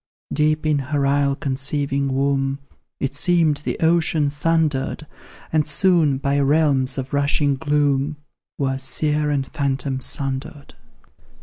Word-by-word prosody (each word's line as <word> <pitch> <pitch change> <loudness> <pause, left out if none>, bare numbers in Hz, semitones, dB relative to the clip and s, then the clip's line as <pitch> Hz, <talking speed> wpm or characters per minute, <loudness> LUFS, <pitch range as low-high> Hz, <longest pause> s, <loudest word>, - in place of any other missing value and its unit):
Deep 155 +1 +1
in 150 -2 +2
her 140 +1 -1
isle 140 0 +2
conceiving 140 0 -1
womb, 135 0 0 0.4
It 135 0 -2
seemed 160 0 +2
the 150 - -4
ocean 160 -3 +2
thundered, 155 -2 0 0.5
And 155 -1 +3
soon, 155 -2 +2
by 140 +1 0
realms 140 -2 +2
of 135 +1 -5
rushing 145 0 +2
gloom, 145 +1 0 0.4
Were 135 -1 -1
seer 150 +3 +1
and 140 -2 0
phantom 135 -1 -2
sundered. 135 +2 -5
140 Hz, 120 wpm, -21 LUFS, 135-150 Hz, 0.5 s, And